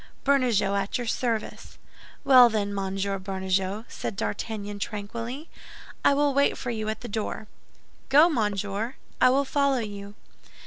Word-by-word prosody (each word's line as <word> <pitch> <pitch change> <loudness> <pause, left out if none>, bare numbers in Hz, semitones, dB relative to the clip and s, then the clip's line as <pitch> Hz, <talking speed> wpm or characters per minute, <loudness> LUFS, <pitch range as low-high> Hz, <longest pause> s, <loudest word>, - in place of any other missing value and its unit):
"Bernajoux, 250 -8 +2
at 200 0 -1
your 245 - -4
service." 230 -1 -3 0.5
"Well, 255 -3 +8
then, 205 -2 -1
Monsieur 195 0 -2
Bernajoux," 190 +2 -2
said - - -5
D'Artagnan, 205 0 -4
tranquilly, 230 +8 -5 0.6
"I 280 - +5
will 290 0 +2
wait 280 +1 +2
for 245 - -4
you 215 -2 -3
at 220 - -4
the 245 - -6
door." 220 0 -4 0.6
"Go, 295 +5 +7
monsieur, 210 - -1 0.3
I 255 - +7
will 275 +2 +2
follow 280 -1 +1
you." 205 -3 -6
220 Hz, 140 wpm, -26 LUFS, 200-255 Hz, 0.6 s, Well